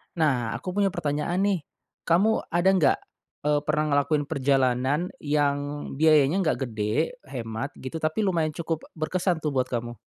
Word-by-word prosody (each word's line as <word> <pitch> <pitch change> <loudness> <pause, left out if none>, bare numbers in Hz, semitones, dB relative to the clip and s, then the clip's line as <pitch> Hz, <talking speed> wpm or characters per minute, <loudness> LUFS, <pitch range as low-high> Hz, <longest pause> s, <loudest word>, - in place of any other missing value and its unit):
Nah, 130 -9 +1
aku 185 - -5
punya 200 +1 +2
pertanyaan 150 +5 -1
nih. 200 -2 +2 0.5
Kamu 200 +7 +3
ada 175 +3 +2
nggak, 185 -6 +3 0.5
eee, 150 0 +2
pernah 150 0 +2
ngelakuin 145 +1 +2
perjalanan 135 +2 +1
yang 145 0 -1
biayanya 155 +2 +5
nggak 165 -5 +1
gede, 110 - -1
hemat 115 +1 -5
gitu, 145 +5 -6
tapi 155 +7 0
lumayan 165 -6 0
cukup 165 -1 -3
berkesan 170 +1 -1
tuh 150 - 0
buat 130 -2 0
kamu? 120 -1 -4
150 Hz, 150 wpm, -26 LUFS, 135-170 Hz, 0.5 s, biayanya